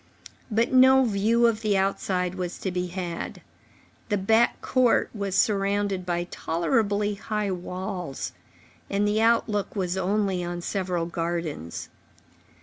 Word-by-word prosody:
But 230 +3 +1
no 260 +1 +7
view 225 +2 +2
of 225 -2 +2
the 210 -3 +2
outside 185 -2 0
was 180 -2 -4
to 190 - -2
be 180 0 -2
had. 175 -2 -5 0.7
The 205 - +2
back 220 +5 +3
court 255 -2 +2
was 200 -3 -3
surrounded 200 -2 +1
by 175 -1 0
tolerably 205 +5 0
high 210 0 -2
walls, 180 -3 -4 0.6
and 200 +1 +1
the 210 +1 +1
outlook 225 -3 +1
was 185 -2 -1
only 190 -1 0
on 175 0 -4
several 180 -2 -2
gardens. 165 - -4
195 Hz, 130 wpm, -26 LUFS, 180-215 Hz, 0.7 s, no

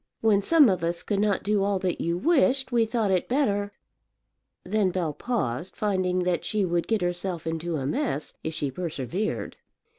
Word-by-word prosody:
When 210 -3 +4
some 305 +6 +6
of 185 -5 +1
us 170 +1 -1
could 205 -2 -1
not 205 -1 +1
do 205 0 +1
all 200 0 +1
that 185 -1 -2
you 170 +1 0
wished, 270 - +2
we 230 -2 +3
thought 220 -3 0
it 185 -2 0
better 205 -7 +1 0.5
" - - -54
Then 205 0 +1
Bell 175 -4 -2
paused, 170 - -3
finding 185 -3 0
that 180 -1 0
she 210 -3 0
would 170 -1 -1
get 220 -4 +1
herself 175 -1 -3
into 165 +1 -2
a 135 -3 -2
mess 140 0 -2
if 160 0 -4
she 145 -3 -2
persevered. 170 - -3
185 Hz, 185 wpm, -26 LUFS, 170-215 Hz, 0.5 s, some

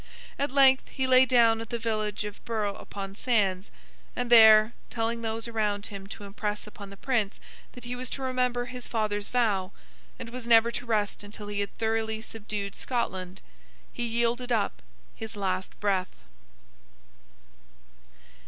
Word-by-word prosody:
At 280 +1 +1
length, 265 -1 +5
he 265 - -2
lay 260 0 +6
down 230 -3 +4
at 225 - -8
the 235 - -2
village 215 -3 -2
of 210 -1 -8
Burgh 210 -3 -2
upon 195 -1 -7
Sands; 200 -4 0 0.5
and 245 -1 -2
there, 220 -1 +8 0.2
telling 230 0 -2
those 225 0 -3
around 210 -3 -1
him 195 -2 -8
to 205 - -9
impress 210 +1 -4
upon 210 -1 -10
the 200 - -12
Prince 220 -4 -1 0.3
that 250 - -11
he 245 +1 -4
was 255 0 -4
to 270 - -5
remember 250 -1 0
his 250 0 -8
father's 210 -2 -1
vow, 210 -7 +1 0.5
and 230 - -8
was 245 -1 -7
never 230 0 +6
to 245 +1 -5
rest 210 -3 0
until 205 0 -9
he 205 -1 -3
had 200 -1 -3
thoroughly 220 0 -1
subdued 210 -2 -5
Scotland, 190 -7 -3 0.5
he - - -5
yielded 235 +1 0
up 220 -4 0 0.3
his 220 0 -7
last 190 -2 -3
breath. 195 -3 0
225 Hz, 155 wpm, -28 LUFS, 205-240 Hz, 0.5 s, there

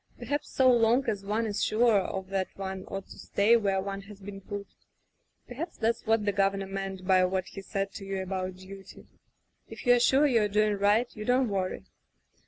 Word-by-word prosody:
Perhaps 290 +1 -3
so 260 - +3
long 240 +2 +4
as 205 -3 -1
one 215 +3 -1
is 205 -2 -1
sure 225 -1 +4
of 190 0 -4
that 195 -1 -1
one 190 -1 -5
ought 195 0 -6
to - - -12
stay 210 +4 +3
where 200 -4 +1
one 195 0 -4
has 200 0 -13
been 195 0 -9
put. 200 +1 -6 0.8
Perhaps 310 +8 -6
that's 230 0 -1
what 225 -1 +2
the 205 - +2
Governor 195 0 +1
meant 195 -1 -5
by 185 -1 +4
what 185 0 0
he 195 - -8
said 195 0 -3
to 200 - -8
you 195 0 -3
about 185 -1 -3
duty 190 +1 -12 0.3
— - - -47
if - - -10
you're 245 0 +6
sure 270 +4 +4
you're 230 -7 +3
doing 210 +1 +2
right 205 +4 +2
you 215 - -6
don't 250 +1 +2
worry." 190 -2 -2
200 Hz, 200 wpm, -28 LUFS, 195-225 Hz, 0.8 s, you're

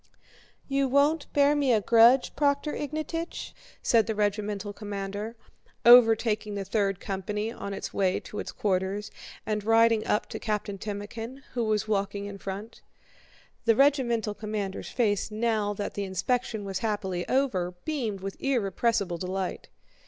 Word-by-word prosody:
"You 275 0 +1
won't 285 +3 +2
bear 285 0 +4
me 280 -3 +2
a 220 - +4
grudge, 235 +4 +5
Prokhór 285 +1 +1
Ignátych?" 310 +3 -4 0.3
said 225 -2 +4
the 220 - -1
regimental 205 0 -1
commander, 205 +1 -5 0.5
overtaking 225 -3 +6
the 200 -1 -3
third 195 -1 0
company 210 +3 -3
on 200 - -6
its 195 - -5
way 190 -2 +1
to 210 - -7
its - - -5
quarters 195 +1 -1 0.3
and 210 -1 -1
riding 225 0 +4
up 210 - +1
to - - -5
Captain 210 -2 -3
Timókhin 225 +6 -6
who 240 -2 0
was 215 0 0
walking 200 -1 -1
in 200 -1 -7
front. 200 +4 -7 0.8
(The 230 -1 +5
regimental 240 -5 +2
commander's 210 -2 -4
face 210 -5 0
now 215 -1 0
that 205 0 -4
the 205 - -3
inspection 215 +3 -1
was 195 -1 -3
happily 190 -5 -2
over 190 -10 +1
beamed 235 -11 -2
with 195 0 -6
irrepressible 210 -7 0
delight.) 185 +1 -4
215 Hz, 145 wpm, -27 LUFS, 200-240 Hz, 0.8 s, overtaking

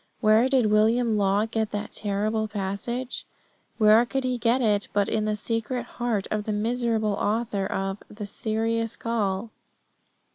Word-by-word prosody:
Where 220 +3 +4
did 250 -6 +3
William 225 +2 +3
Law 200 +1 +2
get 220 -1 -1
that 205 0 -4
terrible 215 +2 -1
passage? 215 +5 -4 0.5
Where 215 +1 +6
could 270 +2 -2
he 255 -1 -1
get 235 +3 +2
it 210 -4 +1
but 205 -1 +2
in 215 -1 0
the 215 0 0
secret 230 +3 -2
heart 235 -4 -2
of 210 -1 -1
the 215 - -2
miserable 225 -1 0
author 205 -1 -1
of 195 +1 -2
the 210 0 -7
Serious 225 +2 -1
Call? 220 -2 -2
220 Hz, 150 wpm, -26 LUFS, 205-235 Hz, 0.5 s, Where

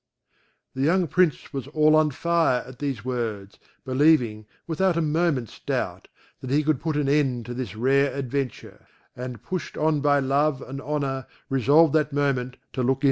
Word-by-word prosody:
The 130 - -4
young 175 +6 +3
Prince 180 -3 +1
was 135 -2 -4
all 155 +1 +3
on 155 -1 +4
fire 165 -2 +1
at 130 -1 -12
these 135 -6 -3
words, 110 -6 -4 0.3
believing, 130 -6 +2 0.2
without 170 +2 +1
a - - +2
moment's 150 - 0
doubt, - - -3 0.3
that 130 - -7
he 145 +3 +2
could 150 -3 0
put 160 -2 -1
an 145 -2 0
end 135 -5 +1
to 120 - -6
this 120 -5 -5
rare 135 +4 +2
adventure; 135 -1 -5 0.3
and 125 -1 -7
pushed 185 -2 -5
on 155 -1 +2
by 145 0 +3
love 140 +1 +1
and 135 +1 -7
honour 140 -3 -2 0.2
resolved 140 +4 +4
that 150 -1 +2
moment 130 -3 0 0.2
to 130 - -2
look 125 - +1
into - - +5
it. 135 - -9
140 Hz, 180 wpm, -25 LUFS, 130-155 Hz, 0.3 s, into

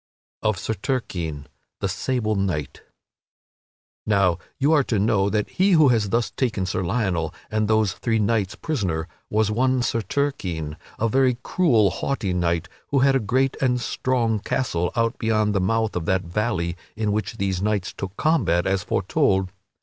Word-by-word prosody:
[Sidenote: - - +2
Of 105 - 0
Sir 110 - -2
Turquine 90 - -3 0.3
the - - 0
sable 120 -5 -1
knight] 90 -8 -2 1.3
Now 100 -5 +3 0.2
you 145 +3 +3
are 150 - +5
to 115 - 0
know 100 -1 +2
that 105 0 0
he 190 +1 +2
who 155 -5 +6
had 115 -3 +3
thus 115 +2 0
taken 110 -7 -1
Sir 90 - -2
Lionel 90 -5 0 0.2
and 110 0 +1
those 110 -3 +2
three 115 +3 -1
knights 105 -2 0
prisoner 90 - -2 0.2
was 110 0 +1
one 130 +2 +2
Sir 115 - 0
Turquine, 95 - -2 0.2
a 115 - +1
very 130 +1 +2
cruel, 115 - +3
haughty 115 -9 -2
knight, 85 0 0 0.2
who 140 - 0
had 135 0 +4
a - - +4
great 130 +5 +1
and 125 -2 +2
strong 120 -3 0
castle 90 -7 -1
out 115 +1 0
beyond 110 -2 +1
the 100 - +1
mouth 110 +3 0
of 85 -2 -2
that 95 +1 +1
valley 85 -2 -1 0.2
in 110 -1 -1
which 105 -2 -2
these 95 -2 -1
knights 105 -2 -1
took 95 +1 -6
combat 155 - +2
as 95 0 +1
aforetold. 95 -1 +1
110 Hz, 170 wpm, -23 LUFS, 95-125 Hz, 1.3 s, who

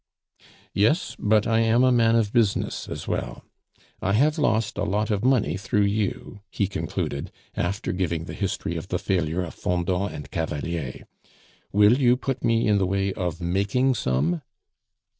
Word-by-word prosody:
"Yes; 110 - +2
but 105 0 +3
I 115 -1 +2
am 115 +2 +3
a 130 - +5
man 115 -2 +4
of 110 -3 +1
business 115 -5 0
as - - -6
well. - - -3 0.6
I 100 - 0
have 150 +8 +3
lost 110 -7 +1
a - - 0
lot 105 +2 0
of 105 0 0
money 120 - +2
through 105 +1 +1
you," 100 0 -2
he 100 - 0
concluded, 70 -6 -3 0.2
after 100 +3 -2
giving 85 -3 -1
the - - -7
history 95 -4 -3
of 80 - -6
the - - -1
failure 90 -2 -1
of 85 - -7
Fendant 90 +2 -1
and 70 -2 -8
Cavalier, 80 -2 -3 0.7
"will 105 +5 +5
you 125 -2 +4
put 135 0 -3
me 115 -1 +2
in 105 -1 +3
the 95 - +1
way 95 0 0
of 90 -3 -3
making 100 +10 +1
some?" 80 - 0
100 Hz, 165 wpm, -25 LUFS, 90-115 Hz, 0.7 s, a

